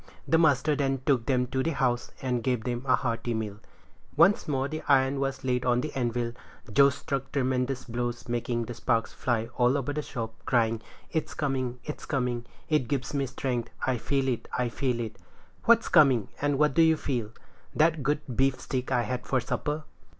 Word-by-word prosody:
The 160 - +4
master 150 -1 +3
then 135 -2 0
took 125 -5 +2
them 125 -2 +2
to 130 0 0
the 165 +5 0
house, 125 -3 0
and 125 -2 0
gave 125 -2 0
them 120 0 -3
a 130 - +6
hearty 120 -2 -2
meal. 105 -2 -4 0.6
Once 175 +6 +5
more 135 -2 0
the 155 +2 -5
iron 135 -1 +4
was 135 0 -2
laid 125 -1 +1
upon 125 0 +2
the 155 - -4
anvil; 120 -2 -1 0.4
Joe 140 +3 +7
struck 135 -1 -4
tremendous 130 -1 0
blows, 120 0 -3
making 120 0 -1
the 120 - -6
sparks 115 -1 0
fly 115 -2 -1
all 125 +3 +4
over 140 +1 -2
the 150 - -1
shop, 115 -6 -5
crying, 115 -2 +1 0.3
"It's 160 - -2
coming! 130 -4 -1
it's 150 - -7
coming! 125 -4 -1 0.2
it 150 -6 +1
gives 135 +2 -2
me 140 -1 0
strength! 125 -2 -2 0.2
I 130 -2 0
feel 135 +2 0
it! 125 -3 -1
I 125 -1 +1
feel 125 0 -1
it!" 115 -1 -4 0.5
"What's 230 +1 +5
coming, 135 - +5
and 145 -1 +1
what 150 0 +3
do 165 - +4
you 160 -1 +5
feel?" 120 -8 -2 0.5
"That 160 0 +3
good 150 +3 0
beefsteak 130 0 0
I 125 -2 +2
had 125 0 -4
for 130 - +2
supper." 150 +5 -2
130 Hz, 190 wpm, -28 LUFS, 120-140 Hz, 0.6 s, Joe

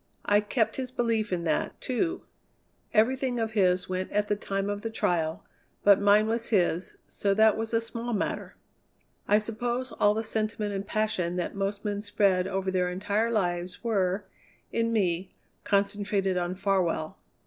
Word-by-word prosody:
I 205 0 +4
kept 220 +2 0
his 260 -1 -3
belief 230 -4 0
in 175 -2 -1
that, 155 -2 -1
too. 335 +8 -1 0.7
Everything 250 +2 +2
of 225 -1 -1
his 185 -4 +2
went 185 0 -3
at 210 0 0
the 205 - +2
time 195 -1 -2
of 205 0 -3
the 225 - -3
trial, 175 -4 -1 0.4
but 200 -1 +6
mine 205 +1 +5
was 225 +1 -1
his, 180 -4 +1
so 200 -1 0
that 220 0 +5
was 225 0 -3
a 230 - +3
small 230 +1 -5
matter. 210 - -2 0.7
I 210 - +5
suppose 240 +4 -2
all 205 0 +3
the 220 - -1
sentiment 215 -1 -2
and 195 0 -4
passion 190 -6 0
that 180 - -2
most 200 +1 -3
men 205 -1 -1
spread 200 -3 +2
over 190 0 -1
their 180 -1 +1
entire 205 +5 0
lives 180 -4 -1
were, 200 -3 0 0.5
in 230 0 0
me, 185 -4 0 0.3
concentrated 200 -1 +1
on 180 0 -1
Farwell. 185 -5 0
205 Hz, 165 wpm, -28 LUFS, 185-225 Hz, 0.7 s, but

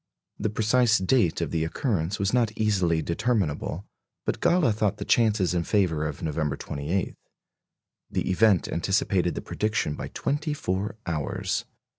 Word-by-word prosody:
The 110 - 0
precise 115 +2 +3
date 95 -2 +2
of - - -2
the 80 -1 0
occurrence 90 - -1
was 100 +2 0
not 120 -3 +3
easily 95 -7 +1
determinable, 95 -3 -1 0.4
but - - -1
Galle 170 -8 +3
thought 105 -1 0
the - - -5
chances 105 -6 +3
in 85 -1 +1
favour 80 -6 +1
of 75 0 -6
November 75 -2 -1
28. 75 +7 -3 1.0
The - - -1
event 100 -1 +4
anticipated 90 0 +1
the - - -3
prediction 105 -8 -1
by - - -5
twenty 150 +1 -2
four 100 -5 -2
hours. 80 -4 -2
95 Hz, 145 wpm, -26 LUFS, 85-110 Hz, 1.0 s, event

